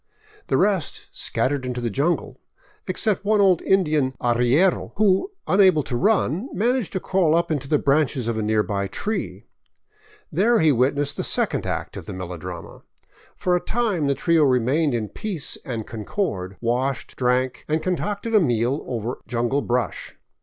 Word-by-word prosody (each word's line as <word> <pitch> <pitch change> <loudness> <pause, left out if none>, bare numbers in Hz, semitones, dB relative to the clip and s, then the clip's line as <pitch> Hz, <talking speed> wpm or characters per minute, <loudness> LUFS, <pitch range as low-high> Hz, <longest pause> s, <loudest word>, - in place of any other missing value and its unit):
The - - +2
rest 190 -6 0
scattered 140 0 -1
into 125 -1 -3
the 120 -2 -2
jungle; 145 - -1 0.5
except 210 -3 0
one 210 +1 +2
old 190 -4 +4
Indian 155 -8 +2
arriero 125 +10 +2
who, 200 - +2 0.2
unable 185 -6 +4
to 125 - -4
run, 200 - +1
managed 240 +1 0
to 190 - -1
crawl 180 -4 +2
up 170 0 +1
into 140 -3 -2
the 150 - +3
branches 140 -4 +1
of 115 - -1
a 110 - -1
nearby 105 -2 0
tree. 210 - -4 0.9
There 230 +5 +3
he 160 -1 +5
witnessed 140 +3 +1
the - - -2
second - - 0
act - - -4
of - - -9
the - - -5
melodrama. 90 -1 -7 0.5
For 180 -1 +1
a 180 - 0
time 215 -10 0
the 140 - +1
trio 165 +2 +3
remained 135 +2 +2
in 110 -2 -2
peace 165 - -4
and 115 -4 -4
concord, 105 - -4
washed, 125 +3 -1
drank, 125 0 0
and 155 +1 0
concocted 200 +6 -2
a 215 - +7
meal 125 - +1
over 120 0 -3
jungle 120 +3 0
brush. 125 -1 -2
145 Hz, 160 wpm, -23 LUFS, 120-185 Hz, 0.9 s, a